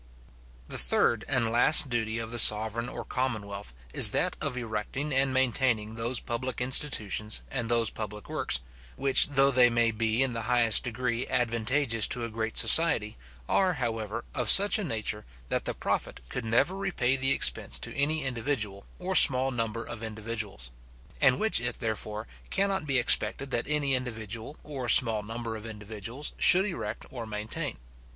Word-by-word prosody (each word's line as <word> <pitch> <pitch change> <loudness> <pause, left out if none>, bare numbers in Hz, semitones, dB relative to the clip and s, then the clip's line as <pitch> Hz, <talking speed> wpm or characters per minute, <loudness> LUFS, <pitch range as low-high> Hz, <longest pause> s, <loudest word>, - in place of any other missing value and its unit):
The - - -2
third 115 - +1
and 120 -5 -1
last 130 +5 +6
duty 115 -3 -3
of 115 0 -6
the 120 - -1
sovereign 110 +2 +6
or - - -8
commonwealth, 105 - -5 0.2
is - - +5
that - - -1
of 125 - -3
erecting 120 +5 -5
and 135 0 +1
maintaining 125 -4 0
those 115 +3 -3
public 120 +1 -5
institutions 115 -5 0
and 125 -4 -4
those 115 -2 +1
public 105 -1 -8
works, - - -1 0.3
which 135 - +5
though 135 -1 +3
they 125 -2 +4
may 115 -1 +1
be 110 +3 -1
in 130 -2 -2
the 115 - -5
highest 120 -4 +3
degree 125 0 -4
advantageous 115 0 0
to 120 -1 -1
a 115 - -8
great 110 0 -4
society, 130 -10 +3 0.3
are, 190 -2 +1
however, 115 -5 -5
of - - -1
such 205 +2 +7
a - - -3
nature, 110 - -4 0.3
that - - -3
the - - -4
profit - - -4
could 125 - -6
never 115 +11 0
repay 185 -10 -1
the 135 0 -1
expense 140 - +1
to - - -5
any 150 +2 0
individual, 115 -6 -4
or 185 +1 -5
small 135 -6 +6
number 115 -2 -4
of 110 - -9
individuals; 110 - -6 0.5
and 130 -3 +3
which 220 - +1
it, 120 0 -4
therefore, 110 -1 -5 0.2
cannot 195 -4 -2
be 135 -2 +3
expected 125 +2 +3
that 120 - -2
any 145 -2 0
individual, 115 +1 -4
or 135 -5 -6
small 110 -2 +5
number 115 +2 -7
of 110 - -9
individuals, 110 +5 -8
should 185 +2 +7
erect 115 - -6
or 120 -4 -8
maintain. 110 +9 -5
120 Hz, 165 wpm, -27 LUFS, 110-135 Hz, 0.5 s, such